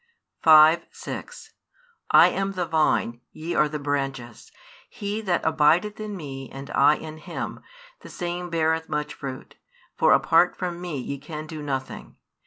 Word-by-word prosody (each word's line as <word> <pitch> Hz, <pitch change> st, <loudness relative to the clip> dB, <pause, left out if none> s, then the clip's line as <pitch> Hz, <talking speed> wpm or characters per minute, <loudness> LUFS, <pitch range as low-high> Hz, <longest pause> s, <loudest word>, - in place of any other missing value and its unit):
5, 160 Hz, +1 st, +7 dB
6 -, -, -9 dB, 0.6 s
I -, -, +7 dB
am 195 Hz, 0 st, -2 dB
the 180 Hz, -2 st, -2 dB
Vine, 155 Hz, -7 st, +1 dB
ye 165 Hz, +2 st, -5 dB
are 150 Hz, -, +3 dB
the 150 Hz, -, -4 dB
brandies: 135 Hz, -5 st, -4 dB, 0.4 s
he 205 Hz, +1 st, -4 dB
that 185 Hz, -5 st, -1 dB
abideth 170 Hz, +8 st, +2 dB
in 210 Hz, -2 st, -5 dB
Me 135 Hz, -5 st, -7 dB
and 135 Hz, +1 st, -9 dB
I 145 Hz, +2 st, +5 dB
in 155 Hz, 0 st, -9 dB
him, -, -, -6 dB, 0.4 s
the -, -, -13 dB
same 175 Hz, 0 st, -4 dB
beareth 160 Hz, 0 st, 0 dB
much 150 Hz, 0 st, -3 dB
fruit: 135 Hz, -2 st, -8 dB, 0.4 s
for -, -, +4 dB
apart -, -, +4 dB
from 175 Hz, -2 st, -4 dB
Me 175 Hz, -5 st, -4 dB
ye 135 Hz, +2 st, -5 dB
can 155 Hz, +1 st, -7 dB
do 155 Hz, -1 st, -8 dB
nothing. 135 Hz, -2 st, -5 dB
155 Hz, 155 wpm, -24 LUFS, 140-175 Hz, 0.6 s, 5